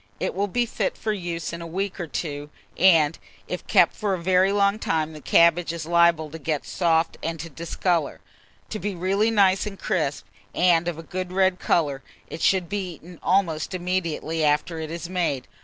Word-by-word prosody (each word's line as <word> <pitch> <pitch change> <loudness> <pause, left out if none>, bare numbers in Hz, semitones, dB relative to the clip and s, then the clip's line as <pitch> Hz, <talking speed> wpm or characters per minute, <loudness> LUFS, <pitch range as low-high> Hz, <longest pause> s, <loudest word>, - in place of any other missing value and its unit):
It - - -2
will 200 +1 0
be 240 +5 0
fit - - -2
for 215 - -1
use 170 -4 -4
in 170 - -6
a 170 - -6
week 195 +3 -3
or 175 - -3
two, 145 -2 -4 0.3
and, 165 -4 +4 0.3
if - - -5
kept - - +5
for 205 -3 -1
a - - -6
very 185 +2 +3
long 200 +1 +2
time, 160 -4 -1
the 155 - -10
cabbage 170 +2 +4
is 165 -2 -5
liable 170 -1 +3
get 155 -1 -3
soft 165 -2 +1
and 165 0 -3
to 165 +2 -7
discolour. 170 +1 -1 0.5
To 215 - -3
be 205 -2 -3
really 195 +5 +1
nice 200 -2 +3
and 195 -1 -7
crisp, 150 - -2 0.3
and 175 -1 +3
of 170 -3 -2
a 165 - -8
good 185 +1 -5
red 185 -1 +2
colour, 145 -5 +1 0.3
it - - -6
should 185 -3 +2
be 190 -2 -3
eaten 170 +2 -14
almost 180 -3 +1
immediately 170 -3 -2
after 150 +3 +1
it 160 -1 -5
is 170 +1 -5
made. 170 -8 -1
170 Hz, 190 wpm, -24 LUFS, 160-190 Hz, 0.5 s, kept